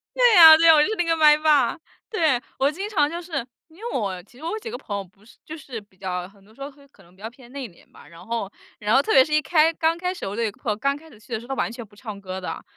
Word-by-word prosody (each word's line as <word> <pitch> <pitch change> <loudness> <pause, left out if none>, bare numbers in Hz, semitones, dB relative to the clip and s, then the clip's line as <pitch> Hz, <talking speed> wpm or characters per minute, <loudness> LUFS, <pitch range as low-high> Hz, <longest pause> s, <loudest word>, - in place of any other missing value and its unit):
对 - - +5
啊， 320 -2 +10
对 330 +1 +4
啊， 320 - +9
我 300 - +5
就 - - -1
是 440 - -2
那 350 - 0
个 330 0 +1
麦 300 -1 +6
霸， 300 -5 +2 0.3
对。 315 - +1 0.2
我 275 - +2
经 390 +6 -6
常 300 -8 +1
就 340 +2 -6
是 300 -8 -5 0.2
因 320 - -22
为 465 +4 -6
我 195 -6 -3
其 245 - -22
实 305 - -14
我 335 - -3
有 435 - -4
几 450 - -8
个 - - -5
朋 205 - -7
友 200 - -4
不 195 +3 -24
是 225 - -20
就 310 - -8
是 255 -6 -8
比 200 -2 -27
较 180 -2 -4
很 200 0 -22
多 215 +2 -22
时 275 - -18
候 275 - -5
会 280 0 -21
可 195 -7 -23
能 175 +2 -23
比 195 - -21
较 225 - -6
偏 250 0 -18
内 270 -3 -6
敛 170 - -23
吧， - - -17
然 170 0 -15
后 225 -4 -4 0.3
然 215 +3 +1
后 270 - +5
特 - - -1
别 265 - +7
是 300 - -5
一 305 - +3
开 315 +2 +3
刚 325 0 0
开 360 +1 -3
始 370 - -12
的 - - -4
我 200 - -6
的 225 -2 -1
朋 215 - -4
友 - - -1
刚 275 +6 -1
开 320 +2 -17
始 220 - -18
去 230 +2 -11
的 220 - -2
时 235 - -13
候， - - -16
他 270 - -2
完 230 - -2
全 235 -1 -9
不 205 0 -23
唱 215 -3 -9
歌 190 -1 -7
的， 180 - -6
270 Hz, 365 characters per minute, -23 LUFS, 210-320 Hz, 0.3 s, 啊